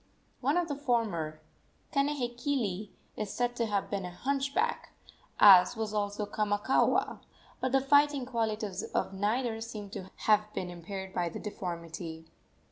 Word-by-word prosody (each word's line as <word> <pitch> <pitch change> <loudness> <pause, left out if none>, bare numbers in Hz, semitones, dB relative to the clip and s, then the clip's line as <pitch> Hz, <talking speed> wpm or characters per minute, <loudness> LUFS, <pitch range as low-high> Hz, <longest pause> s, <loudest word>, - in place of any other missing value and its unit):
One 280 +6 +1
of 350 -1 +1
the 290 - -2
former 215 - -1 0.5
Kanehekili 245 -7 -1 0.3
is 210 -2 -4
said 245 0 -1
to 230 - +1
have 205 -2 -1
been 200 -2 -1
a 180 - -4
hunchback, 275 +9 -1 0.5
as 185 +1 +8
was 220 -1 -3
also 205 0 -1
Kamakaua, 205 +3 +1 0.4
but 260 - -1
the 270 0 +4
fighting 285 -1 +4
qualities 220 -5 -2
of - - -2
neither 225 +3 0
seem 215 -3 -7
to 190 -1 -7 0.2
have 210 0 +4
been 180 -1 -3
impaired 190 +2 -7
by 175 -1 0
the - - -7
deformity. 170 -5 -6
215 Hz, 140 wpm, -30 LUFS, 190-250 Hz, 0.5 s, as